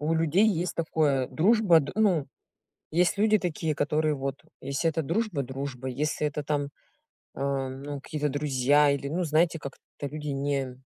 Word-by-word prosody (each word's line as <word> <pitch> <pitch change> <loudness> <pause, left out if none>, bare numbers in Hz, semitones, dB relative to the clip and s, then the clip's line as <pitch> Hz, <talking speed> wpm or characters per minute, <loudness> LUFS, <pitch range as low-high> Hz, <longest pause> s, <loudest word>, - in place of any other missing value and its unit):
У 155 +2 0
людей 165 +6 +3
есть 180 -4 0
такое: 150 -5 +1
дружба 190 -2 +4
др 140 - -5
Ну, 185 -10 +2 0.7
есть 180 +4 +2
люди 215 +1 +4
такие, 160 -3 -2
которые 150 +1 +1
вот: 135 0 -3 0.3
если 140 +5 0
это 160 0 -1
дружба- 170 -1 -1
дружба, 130 0 -5
если 150 +3 -1
это 150 0 -4
там, 145 -1 -1 0.6
ам, 135 -1 -3
ну, 145 -1 -5
какие-то 150 +1 -2
друзья 145 0 +3
или, 140 0 -2
ну, 175 +5 -1
знаете, 165 +2 +2
как-то 140 0 -8
люди 150 +1 -7
не 135 -2 -2
150 Hz, 160 wpm, -27 LUFS, 140-165 Hz, 0.7 s, дружба